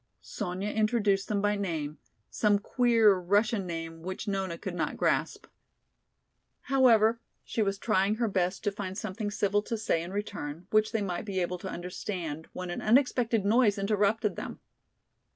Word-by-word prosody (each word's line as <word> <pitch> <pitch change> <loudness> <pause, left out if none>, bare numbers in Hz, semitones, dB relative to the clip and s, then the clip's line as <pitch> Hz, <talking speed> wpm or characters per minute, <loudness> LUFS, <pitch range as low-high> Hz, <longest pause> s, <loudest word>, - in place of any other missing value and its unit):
Sonya 190 0 -4
introduced 215 -3 +1
them 205 -1 -1
by 205 0 +2
name, 160 -7 -3 0.3
some 210 -2 +3
queer 230 -1 +4
Russian 205 +2 +1
name 165 -1 -5
which 185 +5 -5
Nona 190 -4 -2
could - - -5
not - - -2
grasp. - - 0 1.2
However, 230 -4 +4 0.2
she 225 - -2
was 195 -1 0
trying 205 -1 +1
her 230 +1 0
best 185 -2 -1
to 205 - +1
find 195 -2 -5
something 215 0 -3
civil 205 0 +1
to 230 +2 -3
say 190 -6 0
in 170 - -6
return, 185 -6 -5
which 215 0 +3
they 220 -2 0
might 180 -1 -3
be 195 -2 -2
able 180 0 -2
to 190 - -6
understand, 175 -3 -5
when 180 -1 -5
an - - -4
unexpected 235 -3 +2
noise 215 -1 +4
interrupted 210 +1 +1
them. - - -6
205 Hz, 160 wpm, -29 LUFS, 185-215 Hz, 1.2 s, queer